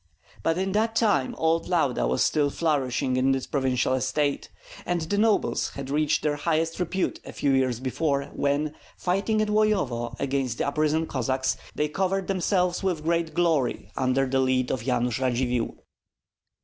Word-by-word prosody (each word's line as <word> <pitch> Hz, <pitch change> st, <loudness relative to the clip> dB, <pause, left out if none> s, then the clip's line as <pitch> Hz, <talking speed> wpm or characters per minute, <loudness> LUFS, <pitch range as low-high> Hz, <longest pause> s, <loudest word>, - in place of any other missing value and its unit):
But 165 Hz, +1 st, +1 dB
in 190 Hz, +1 st, -1 dB
that 220 Hz, +3 st, +1 dB
time 205 Hz, -, +2 dB
old 165 Hz, +1 st, +1 dB
Lauda -, -, +1 dB
was 65 Hz, +1 st, +2 dB
still 145 Hz, -2 st, +2 dB
flourishing 135 Hz, -5 st, 0 dB
in 135 Hz, +1 st, +3 dB
its 130 Hz, -, -3 dB
primeval 130 Hz, -2 st, 0 dB
estate; 130 Hz, +3 st, 0 dB, 0.3 s
and 175 Hz, -1 st, -1 dB
the 180 Hz, +6 st, -1 dB
nobles 220 Hz, -1 st, +2 dB
had 135 Hz, -1 st, -6 dB
reached 150 Hz, +1 st, +1 dB
their 145 Hz, -1 st, 0 dB
highest 165 Hz, +2 st, 0 dB
repute 180 Hz, +1 st, -1 dB
a -, -, -9 dB
few 140 Hz, -, 0 dB
years 130 Hz, -3 st, +1 dB
before, 140 Hz, +2 st, 0 dB
when, 145 Hz, +2 st, 0 dB, 0.2 s
fighting 200 Hz, +4 st, +1 dB
at -, -, -2 dB
Loyovo 195 Hz, -, +1 dB
against 135 Hz, -3 st, -1 dB
the -, -, 0 dB
uprisen 155 Hz, +2 st, +1 dB
Cossacks, 130 Hz, -1 st, -1 dB, 0.2 s
they 150 Hz, -, +1 dB
covered 190 Hz, +4 st, -1 dB
themselves 180 Hz, -1 st, 0 dB
with 180 Hz, -5 st, -1 dB
great 165 Hz, 0 st, 0 dB
glory 165 Hz, -8 st, +1 dB
under 130 Hz, +1 st, +1 dB
the 135 Hz, 0 st, 0 dB
lead 130 Hz, -1 st, +1 dB
of 130 Hz, -, -1 dB
Yanush 125 Hz, -1 st, 0 dB
Radzivill. 125 Hz, -2 st, 0 dB
145 Hz, 160 wpm, -26 LUFS, 130-175 Hz, 0.3 s, in